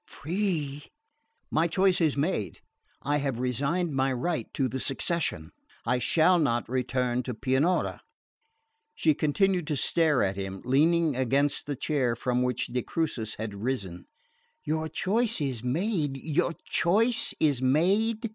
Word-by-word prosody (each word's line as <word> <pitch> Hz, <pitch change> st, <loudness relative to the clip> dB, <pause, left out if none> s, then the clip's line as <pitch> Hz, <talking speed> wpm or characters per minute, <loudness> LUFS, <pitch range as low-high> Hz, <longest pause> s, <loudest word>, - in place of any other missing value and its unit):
"Free 155 Hz, -5 st, -3 dB, 0.3 s
?" 460 Hz, +10 st, -48 dB
"My 160 Hz, +2 st, +2 dB
choice 185 Hz, +1 st, +2 dB
is 155 Hz, -4 st, +2 dB
made. 140 Hz, -, -2 dB, 0.4 s
I 145 Hz, +1 st, +1 dB
have 135 Hz, -4 st, -2 dB
resigned 140 Hz, +7 st, -1 dB
my 135 Hz, 0 st, +1 dB
right 130 Hz, 0 st, -2 dB
to 135 Hz, -, +1 dB
the 130 Hz, +2 st, -4 dB
succession. 135 Hz, -, -1 dB, 0.3 s
I 125 Hz, -, +1 dB
shall 170 Hz, +7 st, +4 dB
not 120 Hz, -6 st, 0 dB
return 125 Hz, 0 st, -1 dB
to 125 Hz, -1 st, -5 dB
Pianura." 135 Hz, +9 st, 0 dB, 0.9 s
She 155 Hz, -, +3 dB
continued 175 Hz, +3 st, +1 dB
to 150 Hz, -, -1 dB
stare 155 Hz, -1 st, +2 dB
at 95 Hz, 0 st, -1 dB
him, 95 Hz, -1 st, -5 dB
leaning 155 Hz, +3 st, +3 dB
against 140 Hz, +4 st, 0 dB
the 145 Hz, -, -2 dB
chair 130 Hz, -4 st, 0 dB
from 125 Hz, +1 st, -1 dB
which 125 Hz, -1 st, 0 dB
de 125 Hz, +1 st, -2 dB
Crucis 120 Hz, -8 st, -3 dB
had 110 Hz, -1 st, -5 dB
risen. 100 Hz, -5 st, -4 dB, 0.6 s
"Your 160 Hz, +1 st, -2 dB
choice 225 Hz, +7 st, +1 dB
is 130 Hz, -6 st, -2 dB
made! 150 Hz, -, -1 dB
Your 160 Hz, +4 st, 0 dB
choice 220 Hz, +8 st, +2 dB
is 145 Hz, -5 st, +2 dB
made!" 200 Hz, -, +2 dB
145 Hz, 145 wpm, -27 LUFS, 125-170 Hz, 0.9 s, shall